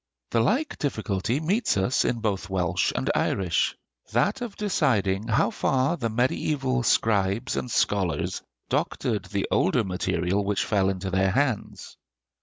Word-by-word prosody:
The 115 Hz, -, +2 dB
like 260 Hz, -, 0 dB
difficulty 110 Hz, -2 st, -1 dB
meets 185 Hz, -, +1 dB
us 95 Hz, +7 st, +2 dB
in 120 Hz, -2 st, -1 dB
both 100 Hz, -4 st, -2 dB
Welsh 90 Hz, -3 st, 0 dB
and 65 Hz, +1 st, 0 dB
Irish: 90 Hz, -3 st, 0 dB, 0.3 s
that 220 Hz, +6 st, +1 dB
of 235 Hz, -5 st, -5 dB
deciding 110 Hz, -, +1 dB
how 115 Hz, 0 st, +2 dB
far 135 Hz, +7 st, +1 dB
the 120 Hz, -8 st, -2 dB
mediæval 130 Hz, +2 st, 0 dB
scribes 105 Hz, +1 st, +1 dB
and 125 Hz, -, -3 dB
scholars 95 Hz, -9 st, 0 dB, 0.3 s
doctored 110 Hz, -5 st, -1 dB
the 100 Hz, +1 st, -2 dB
older 115 Hz, +4 st, +2 dB
material 95 Hz, +1 st, -1 dB
which 100 Hz, 0 st, 0 dB
fell 100 Hz, -3 st, +2 dB
into 95 Hz, 0 st, -3 dB
their 95 Hz, +1 st, +2 dB
hands. 130 Hz, +1 st, -2 dB
110 Hz, 140 wpm, -26 LUFS, 95-130 Hz, 0.3 s, The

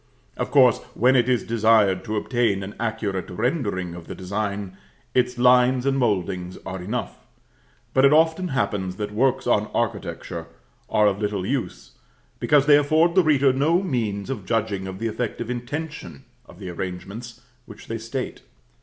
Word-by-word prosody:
Of -, -, -3 dB
course, 130 Hz, -5 st, +5 dB, 0.2 s
when 130 Hz, +3 st, +4 dB
it 125 Hz, 0 st, +3 dB
is 125 Hz, -2 st, +2 dB
desired 110 Hz, -4 st, +3 dB
to 110 Hz, -1 st, -3 dB
obtain 110 Hz, -4 st, 0 dB
an 100 Hz, +2 st, -7 dB
accurate 110 Hz, -5 st, -2 dB
rendering 100 Hz, -, -2 dB
of 85 Hz, -1 st, -10 dB
the -, -, -6 dB
design, 100 Hz, 0 st, -4 dB, 0.4 s
its 125 Hz, -1 st, +1 dB
lines 125 Hz, +1 st, +4 dB
and 135 Hz, 0 st, +2 dB
mouldings 95 Hz, -5 st, -1 dB
are 95 Hz, 0 st, -5 dB
enough; 110 Hz, +7 st, -4 dB, 0.7 s
but 130 Hz, -, +4 dB
it 140 Hz, -, +7 dB
often 160 Hz, +4 st, +3 dB
happens 100 Hz, -, -1 dB
that 105 Hz, +1 st, -4 dB
works 130 Hz, +4 st, +1 dB
on 105 Hz, -3 st, +2 dB
architecture 115 Hz, -3 st, -3 dB, 0.4 s
are 105 Hz, -, +3 dB
of 100 Hz, 0 st, +1 dB
little 105 Hz, -3 st, -1 dB
use, 125 Hz, -7 st, -3 dB, 0.5 s
because 145 Hz, -2 st, +3 dB
they 145 Hz, -1 st, +7 dB
afford 155 Hz, +4 st, +3 dB
the 190 Hz, -, +5 dB
reader 140 Hz, -5 st, +3 dB
no 160 Hz, +7 st, +2 dB
means 115 Hz, -, -2 dB
of 110 Hz, -7 st, -5 dB
judging 105 Hz, -4 st, -1 dB
of 95 Hz, 0 st, -6 dB
the 115 Hz, -, -4 dB
effective 115 Hz, +1 st, -3 dB
intention 125 Hz, -, -6 dB, 0.2 s
of -, -, -15 dB
the 95 Hz, -2 st, -7 dB
arrangements 95 Hz, +7 st, -7 dB, 0.3 s
which -, -, -12 dB
they 115 Hz, 0 st, -4 dB
state. 115 Hz, +4 st, -5 dB
115 Hz, 165 wpm, -23 LUFS, 100-130 Hz, 0.7 s, it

